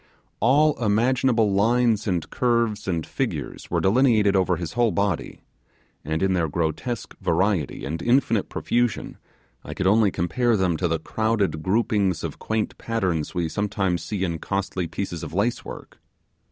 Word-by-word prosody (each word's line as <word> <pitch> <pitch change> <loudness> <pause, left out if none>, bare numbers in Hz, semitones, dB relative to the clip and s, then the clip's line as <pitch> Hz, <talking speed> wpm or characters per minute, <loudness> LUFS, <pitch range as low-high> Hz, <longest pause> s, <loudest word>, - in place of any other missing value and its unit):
All 140 +1 +3
imaginable 115 0 +2
lines 115 +1 +2
and 90 -5 -1
curves 115 -4 0
and 85 -4 -1
figures - - -4
were - - +1
delineated 105 -2 +3
over 95 -1 +2
his 85 -1 -5
whole 120 0 +3
body, 100 -2 -2 0.6
and 80 +4 -2
in 95 -1 +2
their 85 -3 +1
grotesque 85 - -3
variety 85 -2 0
and 80 +4 -4
infinite 120 -2 +2
profusion 120 -1 -1 0.4
I - - -7
could 95 - -2
only 105 +2 +4
compare 110 +7 +1
them 90 -3 +1
to 90 - 0
the 80 0 0
crowded 105 0 -1
groupings 100 -1 +1
of - - -5
quaint 110 -1 -2
patterns 95 -9 -2
we 85 -2 0
sometimes 95 -1 -1
see 100 -3 -3
in 85 -3 -2
costly 95 -2 -2
pieces 85 -2 -4
of 80 0 -7
lacework. 110 +5 -3
100 Hz, 150 wpm, -24 LUFS, 85-115 Hz, 0.6 s, only